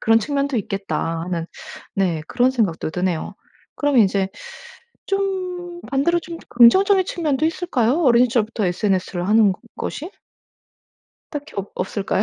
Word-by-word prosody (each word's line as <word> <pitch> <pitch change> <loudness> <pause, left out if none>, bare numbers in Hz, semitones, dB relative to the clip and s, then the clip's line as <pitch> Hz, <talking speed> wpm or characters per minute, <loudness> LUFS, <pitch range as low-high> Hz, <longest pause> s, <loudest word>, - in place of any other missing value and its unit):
그런 225 0 +4
측면도 280 +3 -1
있겠다.' 195 -5 -2
하는 170 -1 -3 0.5
네 175 -5 0
그런 245 +8 +2
생각도 205 -12 -1
드네요. 180 -1 -2 0.4
그럼 290 -3 +2
이제 195 -2 +3 0.8
좀 365 -3 -3
반대로 285 +5 +1
좀 335 +1 -8
긍정적인 380 - +5
측면도 310 -4 0
있을까요? 325 -5 0
어린 245 -3 +5
시절부터 225 -3 0
SNS를 185 -1 -1
하는 215 -2 +5
것 185 - -12 0.2
것이? 330 +6 -5 1.2
딱히 295 -1 -7
없 200 0 -4
없을까요? 195 +1 -1
235 Hz, 300 characters per minute, -21 LUFS, 195-315 Hz, 1.2 s, 긍정적인